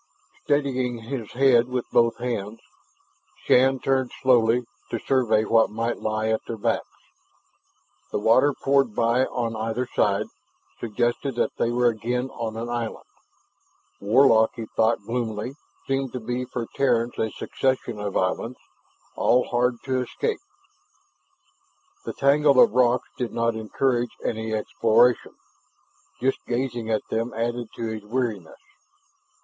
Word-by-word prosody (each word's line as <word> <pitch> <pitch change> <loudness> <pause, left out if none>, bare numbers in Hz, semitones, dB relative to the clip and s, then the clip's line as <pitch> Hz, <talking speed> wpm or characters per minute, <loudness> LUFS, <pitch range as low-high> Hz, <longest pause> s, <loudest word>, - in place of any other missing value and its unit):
Steadying 130 -4 0
his 115 -1 -6
head 125 -2 +4
with 125 -1 -2
both 115 -1 +3
hands, 115 -3 -4 0.9
Shann 130 +1 +4
turned 130 -1 0
slowly, 120 -1 +4 0.2
to 115 - -2
survey 115 -3 +2
what 115 0 +4
might 115 +2 -2
lie 110 0 -1
at 110 - +1
their 115 - -4
backs. 100 - -1 1.2
The - - -1
water, 115 +7 +4
pouring 135 -5 +2
by 120 +3 +2
on 115 -2 -3
either 115 +3 -2
side, 105 -4 +1 0.5
suggested 120 +3 -1
that - - 0
they 115 - +2
were 120 +1 +1
again 120 +3 -2
on 110 -1 -5
an 115 +1 -4
island. 120 -2 -4 0.9
Warlock, 110 +1 +4
he 115 -2 -5
thought 110 -2 +2
gloomily, 115 0 -3 0.3
seemed 135 -1 -1
to 125 - -3
be 125 +2 -3
for 120 -2 -4
Terrans 120 -3 +1
a 110 - +1
succession 125 -2 -2
of 100 -1 -2
islands, 115 +6 -1 0.6
all 125 +1 +2
hard 120 0 +1
to 130 -1 0
escape. 440 - -2 1.7
The - - -4
tangle 140 0 +4
of - - +7
rocks 125 +1 +2
did 125 -2 -2
not 115 0 +1
encourage 120 +2 -1
any 110 0 -2
exploration. 115 +2 +2 0.9
Just 135 +2 0
gazing 120 -2 -2
at 110 -1 0
them 115 +2 -1
added 120 +1 -2
to 115 - -4
his 110 -1 -5
weariness. 110 -6 -3
120 Hz, 135 wpm, -24 LUFS, 110-125 Hz, 1.7 s, of